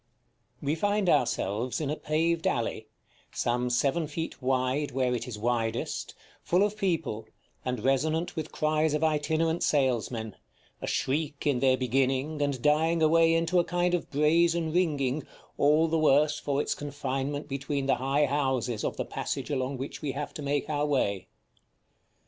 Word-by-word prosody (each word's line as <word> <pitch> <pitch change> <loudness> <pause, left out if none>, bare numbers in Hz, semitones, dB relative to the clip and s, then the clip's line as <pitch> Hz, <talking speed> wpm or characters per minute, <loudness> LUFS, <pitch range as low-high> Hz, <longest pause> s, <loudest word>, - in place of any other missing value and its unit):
§ - - -46 0.6
XII. - - -8
We 145 - +1
find 205 +4 0
ourselves 120 - +1
in 150 -3 -2
a - - -1
paved 165 +2 0
alley, 115 -2 -1 0.4
some 125 +1 0
seven 140 +6 +1
feet 160 0 -5
wide 130 +3 0
where 130 -1 +1
it 120 0 -3
is 120 -4 -6
widest, 115 0 -2 0.3
full 180 +3 +2
of 210 0 0
people, 165 - -2 0.4
and 125 -1 -3
resonant 155 +6 +1
with 160 -1 -4
cries 155 0 +1
of 150 - -1
itinerant 160 +2 +1
salesmen, 120 -6 0 0.5
a - - -4
shriek 145 +1 -1
in 140 -4 +2
their 130 0 +3
beginning, 135 +4 0
and 140 -4 -1
dying 160 +2 +3
away 165 +1 +5
into 165 +2 +2
a - - +4
kind 175 +1 0
of 175 - -1
brazen 165 +2 +2
ringing, 150 -6 +1 0.4
all 150 +3 +4
the 165 0 +1
worse 150 0 +3
for 140 -1 -1
its - - -1
confinement 145 0 -3
between 140 0 -2
the 135 - +2
high 140 +3 +2
houses 130 -5 -1
of - - -2
the - - -2
passage - - -4
along 135 -1 -1
which 135 +2 -6
we 145 -4 -2
have 145 +1 -5
to - - -7
make 145 0 -1
our 150 -1 0
way. 100 -9 0
145 Hz, 165 wpm, -28 LUFS, 130-160 Hz, 0.6 s, away